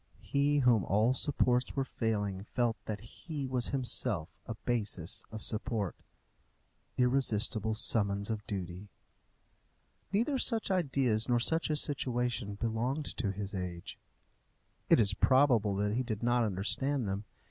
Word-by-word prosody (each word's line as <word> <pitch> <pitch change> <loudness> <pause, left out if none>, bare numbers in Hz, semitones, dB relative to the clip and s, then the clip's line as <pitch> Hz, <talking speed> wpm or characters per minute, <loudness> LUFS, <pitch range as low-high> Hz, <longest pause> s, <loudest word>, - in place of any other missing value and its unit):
He 145 +1 +1
whom 120 -6 +4
all 110 +7 +2
supports 125 -2 +1
were 135 - +1
failing 105 -6 -2
felt 115 +1 -1
that 105 -2 -4
he 145 +5 -7
was 130 -2 0
himself 115 - 0 0.2
a 115 - -4
basis 105 -8 -2
of 110 -1 -5
support. 110 -3 -1 1.0
Irresistible 115 -4 +2
summons 100 -2 +1
of 105 -2 -4
duty! 95 0 -5 1.2
Neither 240 +7 +1
such 225 -5 +1
ideas 135 - +1
nor 120 -1 +3
such 160 +8 +2
a 155 - +1
situation 125 -7 0
belonged 115 +7 -2
to 105 -7 -1
his 100 +1 -6
age. 90 -3 -6 0.9
It - - +6
is 100 -3 +3
probable 120 -6 +3
that 105 +1 0
he 120 - 0
did 115 -3 -4
not 120 0 +2
understand 110 +6 +1
them. 100 +2 -3
115 Hz, 135 wpm, -32 LUFS, 105-130 Hz, 1.2 s, It